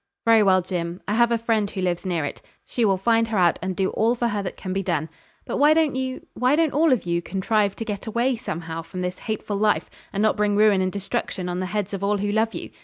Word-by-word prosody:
'Very 225 -1 +6
well, 190 -2 +4
Jim, 175 -1 -4
I 205 - 0
have 235 +1 +3
a 235 - +3
friend 225 -3 0
who 195 - -6
lives 180 0 -1
near 170 -5 0
it. - - -6 0.2
She 240 - -1
will 195 -2 +3
find 230 +3 +2
her 220 -2 -2
out, 175 -3 +3
and 185 +1 -3
do 190 0 0
all 230 +2 +2
for 235 0 0
her 205 -2 -1
that 190 - -6
can 185 -1 -4
be 195 - 0
done. 160 -4 -1 0.4
But - - -3
why 300 +2 +5
don't 315 -3 +2
you 260 0 -4
why 255 +3 +2
don't 320 -2 +2
all 315 +1 +3
of 250 -7 +1
you 170 0 0
contrive 200 +3 0
to 225 - -5
get 210 -1 -5
away 240 +4 +1
somehow 165 -6 -5
from 180 +2 -7
this 180 0 -3
hateful 215 -2 -3
life, 210 +1 +1 0.2
and 200 +1 -1
not 215 - +2
bring 205 -1 +2
ruin 210 -2 +5
and 185 0 0
destruction 190 -2 -3
on 180 0 -2
the 185 - -2
heads 205 0 -3
of 195 0 -4
all 205 +1 +2
who 205 +1 -1
love 220 +1 +1
you? - - -6
205 Hz, 265 wpm, -23 LUFS, 185-230 Hz, 0.4 s, Very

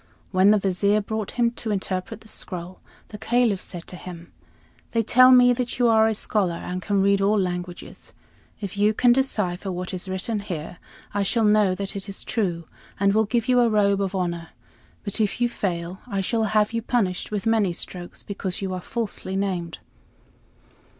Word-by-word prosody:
When 185 +1 +5
the 215 - +6
Vizier 200 +2 +2
brought 215 0 -3
him 235 -1 +3
to 235 -1 -6
interpret 195 +1 -3
the 220 - -16
scroll, 180 -3 -6 0.3
the 210 - -9
Caliph 235 -4 +2
said 175 -3 -6
to - - -9
him: 175 -1 -10 0.6
"They 230 -1 +2
tell 255 +4 +6
me 250 -1 +7
that 245 0 -3
you 245 -1 +3
are 220 -1 +5
a 220 - 0
scholar 195 -4 0
and 180 +2 -5
can 200 0 +1
read 200 0 +3
all 205 +2 +3
languages. 180 -1 -5 0.5
If 200 -1 -6
you 210 +1 +3
can 245 +1 +5
decipher 205 -8 0
what 180 +1 -5
is 185 +1 -4
written 190 +4 -2
here, 175 -4 -6 0.3
I 205 - 0
shall 225 +4 +1
know 210 -3 +4
that 195 +1 -4
it 200 0 -5
is 195 - -7
true, 175 -7 -2 0.3
and 200 0 +3
will 220 +1 +3
give 235 +3 -1
you 250 -1 +4
a 240 -1 +4
robe 200 -2 +2
of 195 0 -2
honor; 170 -3 -2 0.5
but 205 +1 -2
if 210 +1 0
you 240 - +3
fail, 180 -4 -3
I 200 -5 -2
shall 220 +3 0
have 215 +1 +2
you 230 - 0
punished 210 -6 -1
with 210 0 -3
many 220 -4 +2
strokes, 175 +1 -7
because 195 -2 -4
you 190 -2 -3
are 180 - -4
falsely 210 -3 -3
named." 185 -4 -2
200 Hz, 190 wpm, -24 LUFS, 185-220 Hz, 0.6 s, me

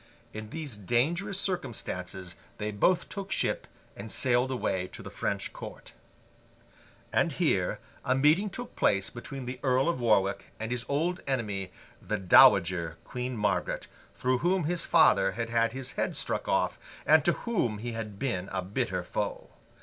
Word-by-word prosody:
In 110 0 -7
these 145 -5 -5
dangerous 165 - 0
circumstances 95 - -3 0.2
they 105 0 -2
both 170 - +2
took 195 -1 -6
ship - - 0 0.3
and 100 +2 -8
sailed 125 +4 +2
away 95 -8 -1
to - - -8
the - - -8
French - - -2
court. - - -9 1.2
And - - +2
here - - +1 0.3
a 130 - +2
meeting 155 +10 +4
took 245 +5 -8
place 100 -1 +2
between 130 +2 -7
the 125 +1 -5
Earl 130 +1 +2
of 170 -6 0
Warwick 100 -4 +2
and 110 +1 -4
his 125 -1 -3
old 165 +6 0
enemy, 105 -8 -2 0.3
the 105 - -2
Dowager 95 -6 +5
Queen 125 -1 -4
Margaret, 105 -1 0 0.3
through 125 0 +1
whom 180 +4 +2
his 165 +2 0
father - - +5
had 115 0 -3
had 115 0 +2
his 130 +1 -6
head - - -2
struck - - -1
off, - - +1 0.3
and 155 -1 +6
to 175 - +3
whom 125 - -1
he 120 +3 -4
had 110 -3 -5
been 100 -7 -2
a 95 -1 -2
bitter 95 -2 -2
foe. - - -4
120 Hz, 160 wpm, -29 LUFS, 105-145 Hz, 1.2 s, and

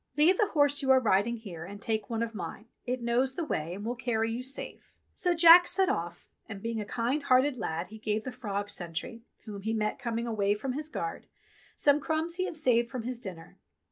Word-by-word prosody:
Leave 325 +6 +5
the 425 - +4
horse 290 -1 +3
you 270 - -2
are 265 0 +7
riding 230 0 +2
here, 185 -8 -8
and 200 +3 -9
take 220 -2 -2
one 230 -1 -1
of 230 0 -4
mine. 200 +1 -6 0.2
It 250 0 -2
knows 250 +3 +1
the 335 - -2
way, 165 - -3
and 205 +2 -7
will 240 - -1
carry 225 -2 -1
you 235 +2 -3
safe." 265 +2 -4 0.2
So 355 -1 +1
Jack 340 +1 +9
set 380 +1 +2
off, 170 +1 -3 0.2
and 200 -3 -6
being 230 +1 -3
a - - -5
kind 245 +7 -1
hearted 260 -1 +3
lad 170 -2 -3
he 220 - -11
gave 215 0 -1
the 255 - -5
frog 205 -5 -4
sentry, 175 +7 -5 0.2
whom 205 -3 -7
he 220 +2 -2
met 215 -1 -1
coming 235 0 -2
away 205 -3 +1
from 255 +5 -3
his 300 +3 -4
guard, 415 +6 -5 0.5
some 290 0 +3
crumbs 320 +3 -1
he 370 - 0
had 335 - -5
saved 240 -5 +2
from 245 -1 -5
his 245 0 -4
dinner. 185 -8 -8
235 Hz, 225 wpm, -29 LUFS, 210-275 Hz, 0.5 s, Jack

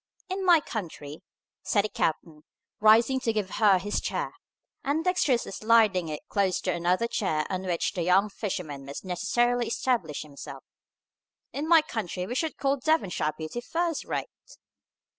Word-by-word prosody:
"In 380 +1 -2
my 345 -4 +6
country," 160 - -6 0.4
said 205 -3 +1
the - - -2
captain, 155 -3 -2 0.4
rising 225 +5 +5
to 240 -3 0
give 210 -4 -2
her 205 -3 +5
his 205 +3 -2
chair, - - -3 0.5
and 295 +4 0
dexterously 320 - +1
sliding 215 -5 +3
it 150 - -6
close 195 -3 +1
to 185 - 0
another 175 +6 +1
chair 155 -9 -1
on 185 0 -3
which 175 -2 0
the 180 - -3
young 185 +4 +4
fisherman 180 -9 -5
must 140 +6 -8
necessarily 240 +6 +1
establish 235 - -1
himself, 145 -2 -10 0.9
"in 295 +3 -3
my 325 -2 +6
country 195 - -4
we 235 - -4
should 315 +5 -2
call 275 0 +1
Devonshire 250 - 0
beauty 160 +10 -5
first 335 +4 -2
rate!" - - -3
210 Hz, 155 wpm, -27 LUFS, 175-255 Hz, 0.9 s, my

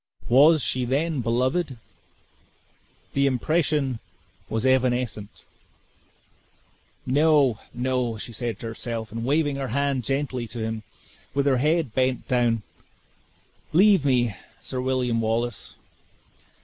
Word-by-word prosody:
Was 145 +4 +6
she 130 - 0
then 140 +3 0
beloved? 130 +5 0 1.4
The 140 0 +3
impression 140 -1 0 0.5
was 110 +2 -1
evanescent: 125 -5 0 1.6
"No, 140 -3 +3
no!" 125 -2 -1
said 115 +1 -4
she - - -17
to - - -6
herself; 115 -1 -5
and 115 +1 -4
waving 145 +2 +1
her 135 -1 -3
hand 140 +1 0
gently 135 -2 -2
to 120 - -8
him 110 0 -3 0.5
with 140 0 +1
her 135 -2 +3
head 150 -1 +1
bent 130 -1 0
down; 120 -3 +1 1.1
"Leave 195 -1 +5
me, 125 -5 +2 0.3
Sir 130 - -4
William 125 -3 0
Wallace. 115 -5 -2
130 Hz, 110 wpm, -25 LUFS, 115-140 Hz, 1.6 s, Was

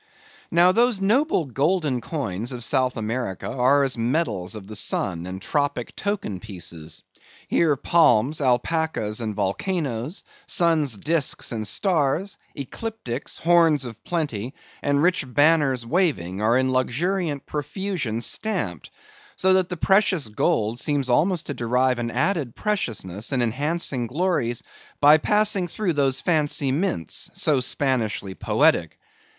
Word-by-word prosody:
Now 175 +2 +5
those 235 0 +2
noble 215 - +2
golden 140 0 0
coins 115 - -4
of 120 -1 -3
South 130 -1 +1
America 110 -3 -3
are 135 +3 +3
as 130 -3 -1
medals 115 - -1
of 105 -3 -8
the 105 +2 -8
sun 90 -4 0
and 95 +1 -6
tropic 145 +3 -2
token 195 - -3
pieces. 85 -5 -8 0.4
Here 160 -4 +2
palms, 145 -2 +3
alpacas, 125 -3 0
and 110 -2 -3
volcanoes; 125 - -2 0.2
sun's 160 - +2
disks 150 +4 -1
and 110 -3 -3
stars; 175 - 0 0.2
ecliptics, 140 - -5
horns 165 -5 +4
of 115 -2 -9
plenty, 135 -8 -3 0.3
and 145 +1 +1
rich 180 -2 +2
banners 145 -3 +3
waving, 115 - 0
are 115 +3 +3
in 130 0 +1
luxuriant 145 +4 -1
profusion 150 - -3
stamped; 120 - -2 0.5
so 190 0 +3
that 185 -1 +2
the 180 - -4
precious 190 - +2
gold 110 +2 0
seems 140 -3 -1
almost 170 +5 +2
to 145 - -3
derive 125 +1 +1
an 120 -1 -2
added 145 - -1
preciousness 115 - -3
and 130 -3 +2
enhancing 135 +1 0
glories, 140 -5 -1 0.4
by 150 +2 +7
passing 210 0 +1
through 180 0 -2
those 135 -3 +1
fancy 150 -4 +1
mints, 155 - -2
so 150 -4 +3
Spanishly 125 -7 -1
poetic. 85 - +2
140 Hz, 130 wpm, -23 LUFS, 115-170 Hz, 0.5 s, by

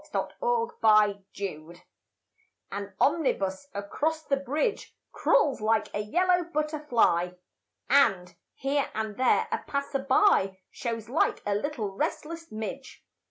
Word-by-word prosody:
SYMPHONY 230 - +2
IN 200 -1 -15
YELLOW 170 -4 -5 1.0
AN 200 -1 -6
omnibus 275 - +1
across 300 +11 -2
the 275 - +1
bridge 290 - -2 0.2
Crawls 275 -6 +2
like 220 0 +1
a - - -2
yellow 355 - +2
butterfly 295 - +1 0.5
And, 195 -11 +3 0.2
here 275 +1 0
and 220 -1 -3
there, 255 - +3
a - - 0
passer 280 0 -2
by 265 - +3
Shows 230 -3 -4
like 275 +7 +1
a 205 - +1
little 215 -2 -2
restless 330 +11 -4
midge. 220 +5 -7
250 Hz, 115 wpm, -28 LUFS, 200-300 Hz, 1.0 s, And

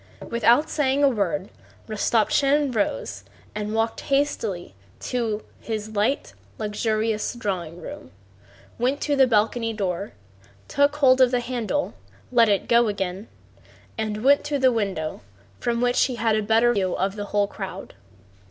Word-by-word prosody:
Without 235 +5 +4
saying 285 -1 +1
a 280 - +6
word 200 -4 -1 0.4
Rostopchín 260 +6 +2
rose 105 - -2 0.3
and 210 +1 -3
walked 225 0 0
hastily 235 - -1 0.3
to 225 -4 -2 0.2
his 220 -1 -4
light, 220 +7 0 0.2
luxurious 215 +1 -1
drawing 180 -7 -4
room, 85 - -9 0.7
went 260 +4 +1
to 290 - +1
the 265 -2 +5
balcony 225 0 +1
door, 195 -2 -3 0.5
took 285 - +2
hold 265 -3 +5
of 255 - +6
the 250 0 +1
handle, 245 +3 -2 0.4
let 235 -3 +5
it 200 -2 +1
go 235 0 +4
again, 195 0 -3 0.7
and 215 0 -3
went 280 +2 +5
to 295 -1 -1
the 260 -1 +4
window 195 -9 -2 0.4
from 235 0 -1
which 245 0 +3
he 255 - -3
had 225 -1 +1
a 215 - +1
better 225 +3 +3
view 190 -4 0
of 195 +1 -1
the 205 -1 -4
whole 205 0 +1
crowd. 195 -2 -7
225 Hz, 145 wpm, -24 LUFS, 205-250 Hz, 0.7 s, a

